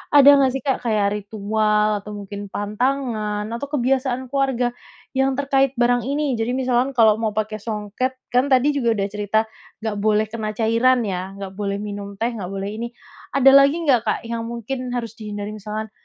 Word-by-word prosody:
ada 285 0 +9
nggak 265 -2 +4
sih 270 - -4
Kak 270 -2 0
kayak 210 -4 +1
ritual 210 0 0
atau 210 +1 -8
mungkin 205 0 -7
pantangan 215 0 -1
atau 235 +5 -4
kebiasaan 260 -2 0
keluarga, 265 -3 +1 0.4
yang 265 0 +1
terkait 275 -1 +1
barang 245 0 +2
ini, 280 -4 -1
jadi 240 +3 0
misalkan 255 0 +1
kalau 220 -2 +5
mau 215 -2 -1
pakai 215 0 -2
songket 215 +4 -3 0.2
kan 250 +3 +3
tadi 270 +2 +4
juga 235 -5 +1
udah 200 -1 -1
cerita 210 +1 +1 0.4
nggak 220 -2 -2
boleh 215 +1 +3
kena 215 -2 -4
cairan 230 +2 +3
ya, 190 -1 -4
nggak 195 -1 -7
boleh 200 -1 -1
minum 200 -1 -6
teh, 230 +4 -1
nggak 200 -6 -5
boleh 195 +1 -4
ini, 235 - -2 0.5
ada 270 0 +7
lagi 275 +2 +7
nggak 255 -7 +4
Kak - - +1
yang 230 0 -4
mungkin 250 +2 -4
harus 230 -1 -5
dihindari? 205 -1 -5
Misalkan, 215 +1 -6
230 Hz, 180 wpm, -22 LUFS, 210-255 Hz, 0.5 s, ada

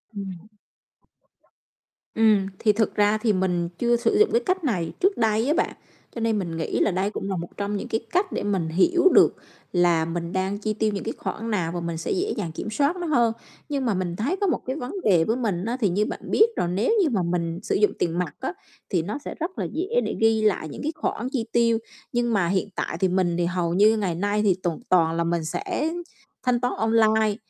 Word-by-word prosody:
Ừm. 195 -2 -7 1.7
Ừm, 215 -3 +4
thì 210 -2 +3
thực 220 0 0
ra 210 +1 +3
thì 215 -1 +1
mình 180 -2 0
chưa 240 0 +2
sử 260 - +1
dụng 430 - +5
cái 470 - +3
cách 375 -1 0
này 180 - -1
trước 390 +2 +2
đây 220 +1 +2
á 300 - +3
bạn, 350 - 0 0.4
cho 230 - -4
nên 225 -2 +1
mình 170 -4 -4
nghĩ 160 - -2
là - - +3
đây 190 +3 0
cũng 200 -2 -5
là 190 - -1
một 170 - -4
trong 205 0 -2
những - - -5
cái 225 - -1
cách 375 +1 +1
để - - -2
mình 190 -5 0
hiểu 345 - +4
được - - +6 0.4
là 175 -2 +3
mình 170 +1 -4
đang 190 +2 -1
chi 215 0 -1
tiêu 215 0 0
những 195 - -3
cái 225 - -3
khoản 225 +1 -4
nào 170 -5 0
và 175 - -3
mình 170 -1 -3
sẽ 165 - -3
dễ 390 +2 0
dàng 175 -6 -3
kiểm 185 - -5
soát 285 +9 +1
nó 350 -2 -4
hơn. 235 -6 +3 0.4
Nhưng 275 -3 -1
mà 225 - +2
mình 180 -2 -2
thấy 270 - -1
có 400 - +2
một 350 - +1
cái 260 - -2
vấn 250 -4 -5
đề 175 -6 +4
với 225 +7 0
mình 200 -6 -1
á, 240 +2 -2
thì 205 - +2
như 200 +4 +1
bạn - - -5
biết 440 - +6
là - - 0
nếu 195 - +1
như 315 - +2
mà 205 -7 0
mình 170 0 -2
sử - - -1
dụng 210 +1 +3
tiền 170 0 0
mặt 180 - -3
á - - -3 0.4
thì 175 -4 +1
nó 200 - -4
sẽ - - -5
rất 345 +4 -4
là - - -1
dễ 345 +5 -3 0.2
để - - -2
ghi 225 0 +4
lại 200 -7 +1
những - - -8
cái 305 - -1
khoản 250 -5 -2
chi 240 -6 -1
tiêu. 230 -1 +3 0.3
Nhưng 240 -1 0
mà 185 -5 +2
hiện 190 +2 0
tại 165 - -3
thì 190 - +3
mình 180 -2 +1
thì 175 - +1
hầu 175 -1 -1
như 215 +4 +5
ngày 190 -6 -1
nay 205 +3 0
thì 195 -3 +3
toàn 175 -3 -1
toàn 165 -2 +3
là 170 - +1
mình 170 -1 -1
sẽ 355 - -2 0.5
thanh 250 -1 +2
toán 250 - 0
online, 220 -1 +3
210 Hz, 245 wpm, -24 LUFS, 175-240 Hz, 1.7 s, được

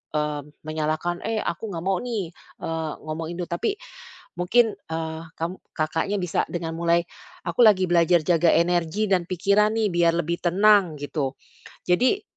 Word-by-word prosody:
eee, 150 -1 0 0.2
menyalahkan, 155 +3 -2
"Eh, 225 - -1
aku 170 +6 -3
nggak 170 -5 -5
mau 190 -1 +1
nih, 220 -9 -3 0.3
eee, 160 -1 -2
ngomongin 160 +2 -5
duh", - - -7
tapi 175 - -1 0.6
mungkin, 210 +4 +3
eee, 160 0 -4
kam 170 +3 -4 0.2
Kakaknya 165 +6 -1
bisa 180 -2 0
dengan 165 -2 -4
mulai, 170 0 +3 0.4
"Aku 240 - +4
lagi 190 -4 +5
belajar 170 0 +4
jaga 165 +1 +3
energi 175 +4 +1
dan 185 -3 +2
pikiran 200 +4 +2
nih, 215 - +2
biar 170 -1 +3
lebih 170 +2 -2
tenang", 195 0 +4
gitu. 145 -2 -2 0.5
Jadi 250 - +2
175 Hz, 150 wpm, -24 LUFS, 160-195 Hz, 0.6 s, lagi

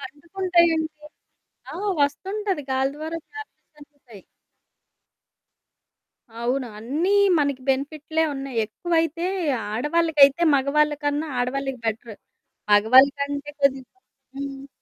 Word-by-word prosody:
తట్టుకుంటాయండి, 335 +3 0 0.9
ఆ! - - -6 0.2
వస్తుంటది 380 +3 -1
గాలి 265 +1 +1
ద్వారా 315 +2 -5 0.2
వ్యాప్తిచెందుతాయి. 290 - -14 2.2
అవును 250 +2 -1
అన్నీ 290 - -1 0.3
మనకు 280 -3 0
బెనిఫిట్లే 295 +4 -1
ఉన్నాయి. 270 -2 -6
ఎక్కువైతే 330 +7 -1 0.5
ఆడవాళ్ళకైతే, 295 +3 +3
మగవాళ్ళకన్నా, 290 +2 +1
ఆడవాళ్ళకి 265 +1 -2
బెటరు. 225 0 -4 0.6
మగవాళ్ళ 230 +7 +7
కంటే 285 0 -3
కొద్దిగ 270 -2 +2 0.5
హ్మ్. 275 0 -6
285 Hz, 80 wpm, -23 LUFS, 265-320 Hz, 2.2 s, మగవాళ్ళ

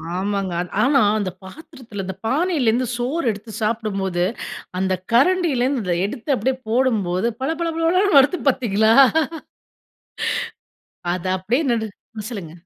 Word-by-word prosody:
ஆமாங்க. 195 -1 -2
அ - - -1 0.2
ஆனா, 270 +1 +4 0.2
அந்த 195 -3 -2
பாத்திரத்தில, 230 - -9
அந்த 190 0 -5
பானையிலிருந்து 255 -4 +1
சோறு 260 +6 -2
எடுத்து 215 +2 -9
சாப்பிடும்போது, 200 -5 -1 0.6
அந்த 190 0 +1 0.2
கரண்டில 330 +2 +3
இருந்து 230 -10 0
எடுத்து 265 +5 -2
அப்படியே 260 +4 -1
போடும்போது 225 -5 +1
பள 270 - 0
பள 335 - 0
பளன்னு 345 +1 +3
வருது 285 +6 +3
பார்த்தீங்களா? 220 -4 +2 2.2
அத 180 0 -6
அப்டியே 230 - 0
நடு 225 -1 0 0.3
ம் 215 0 -5
சொல்லுங்க. 190 -9 -6
230 Hz, 125 wpm, -21 LUFS, 200-275 Hz, 2.2 s, ஆனா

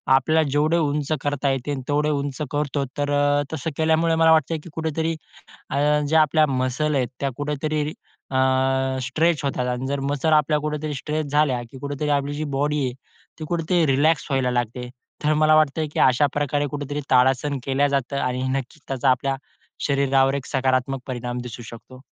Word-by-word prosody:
आपल्याला 155 +4 +3
जेवढे 150 +4 +2
उंच 150 -2 -1
करता 145 -1 -1
येते 135 +2 -2
तेवढे 150 +1 +1
उंच 140 -1 -2
करतो, 145 -1 -1
तर 145 0 -1
अ, 145 0 +2
तसं 160 +1 -3
केल्यामुळे 160 +1 +2
मला 160 0 +5
वाटते 160 0 +3
की - - -10
कुठेतरी 160 0 -2 0.6
अ, - - -2 0.3
ज्या 160 +1 +4
आपल्या 155 +1 +3
मसल 130 +3 -1
आहेत 130 -3 +1
त्या 140 - 0
कुठेतरी 150 +1 -2 0.5
अ, 130 - -2 0.7
स्ट्रेच 155 +5 +1
होतात. 130 -2 -1
आणि 125 +1 -2
जर 140 +1 -2
मसल्स 140 +3 0
आपल्या 150 0 +3
कुठेतरी 150 0 -3
स्ट्रेच 150 +2 -3
झाल्या 145 -5 +2
की 130 - -11
कुठेतरी 145 +2 -4
आपली 145 0 0
जी 155 +1 -3
बॉडी 145 +1 0
आहे 125 - -1 0.5
ती 155 - -5
कुठेतरी 170 0 +1
रिलॅक्स 145 +4 +2
व्हायला 130 -2 +1
लागते. 125 0 -2 0.4
तर 150 - +3
मला 155 0 +4
वाटतं 155 0 +3
की - - -1
अशा 130 +3 +4
प्रकारे 145 0 0
कुठेतरी 145 0 -4
ताडासन 130 +2 +3
केलं 135 +1 +2
जातं 140 -1 -1
आणि 125 0 -1 0.2
नक्की 130 -2 -9
त्याचा 135 0 +1
आपल्या 135 +1 0 0.5
शरीरावर 135 -1 +2
एक 140 -1 -4
सकारात्मक 130 0 0
परिणाम 125 -1 -4
दिसू 120 -1 -8
शकतो. 120 +3 -12
145 Hz, 175 wpm, -23 LUFS, 130-150 Hz, 0.7 s, मला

